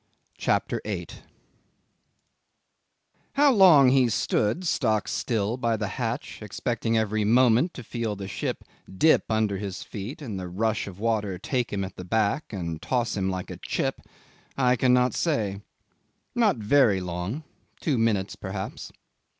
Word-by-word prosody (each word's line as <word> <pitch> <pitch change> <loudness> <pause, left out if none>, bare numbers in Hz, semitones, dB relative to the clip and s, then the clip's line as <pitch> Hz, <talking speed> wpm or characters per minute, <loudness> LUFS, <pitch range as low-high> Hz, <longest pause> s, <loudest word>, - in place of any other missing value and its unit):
CHAPTER - - 0
8 - - -5 2.1
'How 285 0 +5
long 175 - +7
he 130 -2 +4
stood 110 - 0
stock 110 - +1
still 110 0 -1
by 115 -3 0
the 105 -2 -2
hatch 115 +1 -4
expecting 115 +2 -1
every 110 -1 0
moment 125 - +4
to 125 - -7
feel 115 -2 -3
the 95 -1 -6
ship 95 - -4 0.3
dip 155 +12 +4
under 110 -3 +1
his 100 -2 -5
feet 105 +6 -7
and 110 -10 -5
the 90 - -5
rush 105 +5 -1
of 95 -2 -9
water 105 -4 0
take 125 +5 -2
him 100 -1 -1
at 95 - -7
the 90 - -6
back 110 - 0
and 85 -6 -4
toss 120 -3 -1
him 95 -2 0
like 95 -1 -4
a - - -7
chip, - - -2 0.6
I 125 -2 +3
cannot 125 +1 +3
say. 105 - -1 0.7
Not 230 -4 +3
very 110 -2 +3
long 90 - -4 0.4
two 140 -7 0
minutes 105 -4 +1
perhaps. 95 0 -6
110 Hz, 145 wpm, -26 LUFS, 100-125 Hz, 2.1 s, long